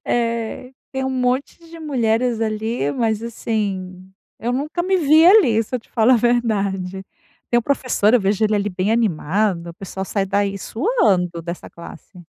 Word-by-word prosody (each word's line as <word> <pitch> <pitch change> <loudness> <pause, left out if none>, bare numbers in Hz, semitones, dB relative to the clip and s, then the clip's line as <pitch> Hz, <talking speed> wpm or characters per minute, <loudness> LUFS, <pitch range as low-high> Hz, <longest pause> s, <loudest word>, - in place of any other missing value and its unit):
eh, 235 +1 -2 0.2
tem 265 0 -2
um 265 - -1
monte 255 +1 -1
de 330 - -11
mulheres 245 -5 0
ali, 220 - -1
mas, 220 -2 -1
assim, 195 -5 -4 0.3
eu 240 +2 -1
nunca 300 +7 -2
me 380 +2 +1
vi 315 -1 +5
ali 345 - +6
se 240 - -8
eu - - +1
te - - -29
falar 230 +3 +4
a - - +5
verdade. 200 -6 0 0.5
Tem 240 - +4
um 240 - -1
professor, 255 -5 +1
eu 250 - +5
vejo 200 +2 +1
ele 215 0 +2
ali 205 +1 -1
bem 190 +3 -1
animado, 190 -3 0
o 170 - -13
pessoal 190 0 -6
sai 195 0 -2
daí 200 0 0
suando, 190 - 0
dessa 170 +1 -7
classe. 170 +1 -12
220 Hz, 175 wpm, -20 LUFS, 195-250 Hz, 0.5 s, ali